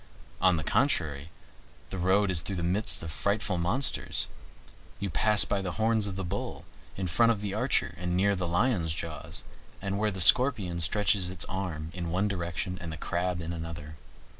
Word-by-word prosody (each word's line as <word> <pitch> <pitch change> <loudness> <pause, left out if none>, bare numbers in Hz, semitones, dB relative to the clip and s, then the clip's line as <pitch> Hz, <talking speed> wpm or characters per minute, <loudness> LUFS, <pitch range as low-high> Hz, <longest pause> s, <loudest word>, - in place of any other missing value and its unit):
On 90 -1 +5
the 80 - -3
contrary, 80 - +1 0.6
the 95 - -4
road 95 +2 +3
is 85 -3 +2
through 95 +3 -4
the 85 - -3
midst 95 +3 +1
of 80 - -5
frightful 100 +4 0
monsters. 115 +11 +1 0.7
You 100 -2 -3
pass 105 +5 +4
by 100 - -1
the 90 -2 -4
horns 110 -1 +2
of 100 - -5
the 95 - -4
Bull, 95 +3 -5 0.3
in 95 - -2
front 115 +7 +3
of 110 - -1
the 100 -1 -4
Archer, 125 -1 0
and 90 0 -1
near 100 +1 +3
the 90 -2 -2
Lion's 85 -3 +1
jaws, 80 -2 -6 0.4
and 100 +1 -3
where 105 0 +2
the 95 -2 -5
Scorpion 95 -3 +5
stretches 100 +1 +3
its 90 -2 -2
arms 85 -4 -5
in 85 -2 -4
one 95 +4 +1
direction 90 -1 -3
and 85 -2 -5
the 80 - -6
Crab 90 +1 -2
in 80 +1 -4
another. 80 -2 -7
90 Hz, 190 wpm, -29 LUFS, 85-100 Hz, 0.7 s, On